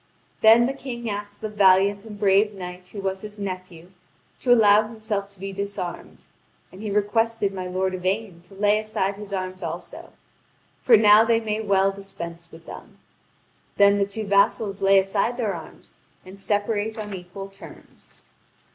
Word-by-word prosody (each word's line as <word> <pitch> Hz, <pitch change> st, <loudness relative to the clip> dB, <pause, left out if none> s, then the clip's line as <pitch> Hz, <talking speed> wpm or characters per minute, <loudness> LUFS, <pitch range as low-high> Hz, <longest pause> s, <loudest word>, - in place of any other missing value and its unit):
Then 225 Hz, +2 st, +7 dB
the 265 Hz, -, -1 dB
King 245 Hz, -4 st, -7 dB
asked 205 Hz, 0 st, -7 dB
the 220 Hz, -, -3 dB
valiant 200 Hz, 0 st, +3 dB
and 210 Hz, -2 st, -10 dB
brave 205 Hz, +1 st, +3 dB
knight 180 Hz, -1 st, -8 dB
who 200 Hz, +2 st, -8 dB
was 190 Hz, 0 st, -3 dB
his 210 Hz, 0 st, -10 dB
nephew 185 Hz, -3 st, -7 dB, 0.5 s
to 250 Hz, -, 0 dB
allow 215 Hz, -2 st, +6 dB
himself 215 Hz, -3 st, -4 dB
to 200 Hz, -2 st, -17 dB
be 195 Hz, +1 st, -6 dB
disarmed; 200 Hz, -2 st, -6 dB, 0.5 s
and 185 Hz, -, -12 dB
he 215 Hz, -, -4 dB
requested 210 Hz, 0 st, 0 dB
my 185 Hz, -1 st, -5 dB
lord 185 Hz, +1 st, -1 dB
Yvain 185 Hz, 0 st, -3 dB
to 195 Hz, -, -16 dB
lay 205 Hz, +1 st, +2 dB
aside 215 Hz, -2 st, -2 dB
his 205 Hz, 0 st, -10 dB
arms 185 Hz, -1 st, -4 dB
also; 170 Hz, +1 st, -7 dB, 0.7 s
for 235 Hz, -3 st, +6 dB
now 210 Hz, 0 st, +7 dB
they 230 Hz, 0 st, +2 dB
may 220 Hz, -1 st, -3 dB
well 195 Hz, -2 st, +2 dB
dispense 170 Hz, -4 st, -9 dB
with 165 Hz, 0 st, -14 dB
them. -, -, -11 dB, 0.8 s
Then 200 Hz, 0 st, +5 dB
the 200 Hz, -, +1 dB
two 215 Hz, +2 st, -5 dB
vassals 200 Hz, 0 st, +1 dB
lay 195 Hz, 0 st, +5 dB
aside 200 Hz, +5 st, +1 dB
their 220 Hz, -5 st, -1 dB
arms 165 Hz, -2 st, -11 dB, 0.3 s
and 190 Hz, +2 st, -12 dB
separate 205 Hz, +2 st, -1 dB
on 210 Hz, -2 st, -6 dB
equal 190 Hz, +2 st, -8 dB
terms. 195 Hz, +1 st, -15 dB
200 Hz, 165 wpm, -24 LUFS, 190-215 Hz, 0.8 s, Then